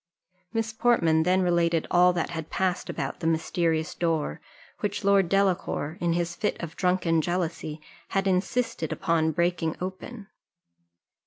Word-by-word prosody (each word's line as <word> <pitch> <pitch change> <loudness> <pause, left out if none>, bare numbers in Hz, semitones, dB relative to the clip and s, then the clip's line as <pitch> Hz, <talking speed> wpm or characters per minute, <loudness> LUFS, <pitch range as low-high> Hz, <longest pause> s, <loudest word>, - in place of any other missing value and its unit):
Miss 225 -1 -2
Portman 170 -10 +3
then 185 +3 +2
related 170 -2 +2
all 180 +1 +6
that 175 -1 -2
had 160 -2 -5
passed 185 -1 -1
about - - -4
the 165 - -2
mysterious 165 0 0
door, 160 - -1 0.4
which 205 0 -2
Lord 195 -3 +4
Delacour, 185 -5 0
in 170 -1 +1
his 170 0 -1
fit 210 - -1
of 165 -2 -6
drunken 180 -3 +2
jealousy, 165 -2 -3 0.3
had 195 0 0
insisted 195 +6 0
upon 165 -3 +1
breaking 170 0 0
open. 190 +4 -6
175 Hz, 140 wpm, -26 LUFS, 165-190 Hz, 0.4 s, all